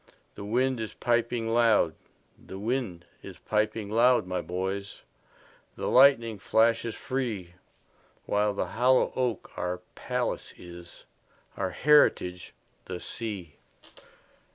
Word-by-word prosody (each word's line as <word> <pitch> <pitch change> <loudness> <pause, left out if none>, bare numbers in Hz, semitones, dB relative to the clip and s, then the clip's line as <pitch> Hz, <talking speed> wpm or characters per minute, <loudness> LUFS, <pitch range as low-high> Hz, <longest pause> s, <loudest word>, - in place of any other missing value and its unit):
The 100 - -9
wind 125 +4 0
is 110 -1 -5
piping 120 -1 0
loud; 115 -8 +4 0.4
The 95 - -11
wind 105 -5 -3 0.2
is - - -10
piping 105 -1 -1
loud, 120 0 +4
my 90 -1 -2
boys, 95 +3 -4 0.7
The - - -5
lightning 120 -5 +5
flashes 115 +3 +2
free—While 105 -2 -4
the - - -1
hollow 125 +2 +3
oak 125 -5 -2
our 90 0 -2 0.2
palace - - -3
is, 85 0 -13 0.5
Our - - -2
heritage 90 - +3 0.3
the 90 -1 -6
sea. 100 -10 -6
110 Hz, 105 wpm, -28 LUFS, 90-120 Hz, 0.7 s, lightning